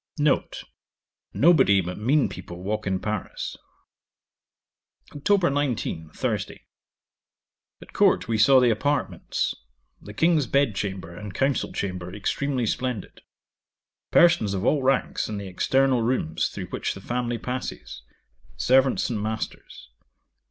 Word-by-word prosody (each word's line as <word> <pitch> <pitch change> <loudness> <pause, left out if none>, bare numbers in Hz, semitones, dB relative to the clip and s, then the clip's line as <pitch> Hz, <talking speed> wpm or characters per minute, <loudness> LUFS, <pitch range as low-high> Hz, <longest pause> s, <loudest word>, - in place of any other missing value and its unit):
'N. 150 -1 +3 0.9
Nobody 135 - +5
but 90 +1 -4
mean 135 +7 +2
people 85 +1 -9
walk 105 +1 -2
in 95 -1 0
Paris. 105 -1 -4 1.6
'Oct. 175 +2 +2
19. 125 - -2
Thursday. - - -4 1.2
At - - -18
Court, - - +3
we 115 - 0
saw 130 +5 +7
the 125 -2 +4
apartments; 145 +7 -1 0.5
the 105 - -11
King's 160 0 +3
bed 140 -5 +2
chamber 95 -4 -5
and 100 0 -8
council 135 -1 0
chamber 90 -2 -4
extremely 130 +4 -1
splendid 125 -2 -3 0.9
Persons 165 - +4
of 95 +3 -2
all 145 +1 +3
ranks 135 -3 0
in 105 - -4
the 100 - -6
external 130 +7 +2
rooms 115 -10 0
through - - -7
which - - -3
the 95 - -10
family 120 +2 -2
passes: 125 +2 -6 0.6
servants 130 - +3
and 110 -3 -2
masters. 110 - -6
120 Hz, 125 wpm, -25 LUFS, 100-135 Hz, 1.6 s, saw